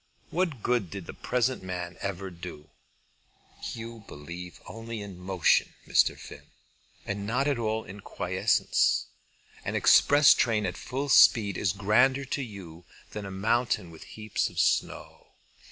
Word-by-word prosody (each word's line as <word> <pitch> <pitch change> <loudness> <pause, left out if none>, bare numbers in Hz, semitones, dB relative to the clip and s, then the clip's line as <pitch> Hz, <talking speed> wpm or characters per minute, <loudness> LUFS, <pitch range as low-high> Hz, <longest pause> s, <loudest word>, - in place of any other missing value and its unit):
What 165 - -1
good 120 -7 0
did 100 -1 -7
the - - -8
present 125 +1 -1
man 90 -1 -5
ever 95 -1 -4
do?" 85 -3 -10 1.0
"You 115 -1 -8
believe 85 +4 -9
only 115 0 -7
in 100 -3 -9
motion, 90 -2 +1
Mr. - - +3
Finn; - - -12 0.6
and 100 0 -4
not 125 +5 0
at 140 -4 0
all 110 -1 -1
in 100 +2 -10
quiescence. - - +1 0.6
An - - -3
express 145 0 +6
train 110 -3 +1
at 90 - -3
full 135 +3 -4
speed 105 -7 +6
is 95 - 0
grander 125 +8 +2
to 140 +1 -3
you 95 -8 -9 0.3
than 105 -2 -6
a - - -7
mountain 110 -1 0
with 80 - -12
heaps 110 -1 -1
of - - -16
snow. - - -1
105 Hz, 145 wpm, -28 LUFS, 90-120 Hz, 1.0 s, express